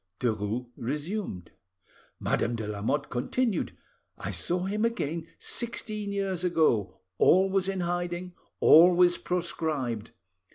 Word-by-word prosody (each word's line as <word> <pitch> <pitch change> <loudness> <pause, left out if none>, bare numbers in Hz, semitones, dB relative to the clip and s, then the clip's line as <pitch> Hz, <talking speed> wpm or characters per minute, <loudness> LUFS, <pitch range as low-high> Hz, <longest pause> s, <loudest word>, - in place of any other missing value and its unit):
Derues 110 +1 -1
resumed. 145 - -4 0.7
"Madame 120 +1 0
de 110 -2 -4
Lamotte 110 +8 -1
continued: 205 - -1 0.4
'I - - -4
saw 180 +1 -1
him 210 +3 -1
again 170 -9 -1
sixteen 215 -3 -3
years 195 -3 -2
ago, 155 - +1 0.2
always 190 +1 +4
in 190 -1 -2
hiding, 175 +1 -2 0.3
always 175 +2 +7
proscribed. 155 -10 -2
175 Hz, 100 wpm, -28 LUFS, 125-190 Hz, 0.7 s, always